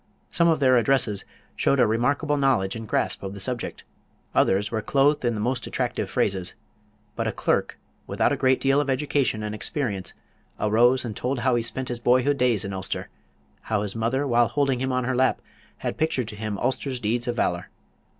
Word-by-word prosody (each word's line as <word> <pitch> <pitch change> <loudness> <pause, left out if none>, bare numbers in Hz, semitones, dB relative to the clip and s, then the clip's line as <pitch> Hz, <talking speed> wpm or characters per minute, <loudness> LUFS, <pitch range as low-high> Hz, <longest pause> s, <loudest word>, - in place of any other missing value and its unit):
Some 170 - +3
of 160 -3 +3
their 130 -3 +5
addresses 115 -5 +1 0.3
showed 140 - +2
a 125 - +6
remarkable 140 +7 +1
knowledge 130 -9 +1
and 115 -1 -7
grasp - - 0
of 95 0 -6
the - - -8
subject; 120 +4 -4 0.5
others 100 +2 +2
were 110 -1 -1
clothed 145 +4 +2
in 120 -2 +1
the - - -3
most 120 +3 -1
attractive - - -2
phrases. 95 -2 0 0.6
But - - -1
a - - 0
clerk, - - 0 0.3
without - - +1
a - - +2
great 130 0 +2
deal 135 +1 +3
of 140 - -3
education 135 -5 0
and 105 0 -3
experience, 110 - -2 0.5
arose 120 +5 +3
and 110 -3 -5
told 125 0 -2
how 130 0 +2
he 120 - +2
spent 125 +3 -2
his 120 -1 -3
boyhood 130 +4 +2
days 120 -5 +2
in 100 - -4
Ulster, 95 -1 -4 0.6
how 105 -2 +1
his 105 0 -3
mother 120 +5 0
while 120 -3 +3
holding 135 +1 0
him 130 0 0
on 125 0 0
her 130 +1 -1
lap 130 +1 +2 0.4
had - - -4
pictured 145 -7 0
to - - -6
him 105 -1 -4
Ulster's 130 +2 -2
deeds 120 +2 -1
of 120 - -1
valor. 90 -6 -1
120 Hz, 200 wpm, -25 LUFS, 110-135 Hz, 0.6 s, a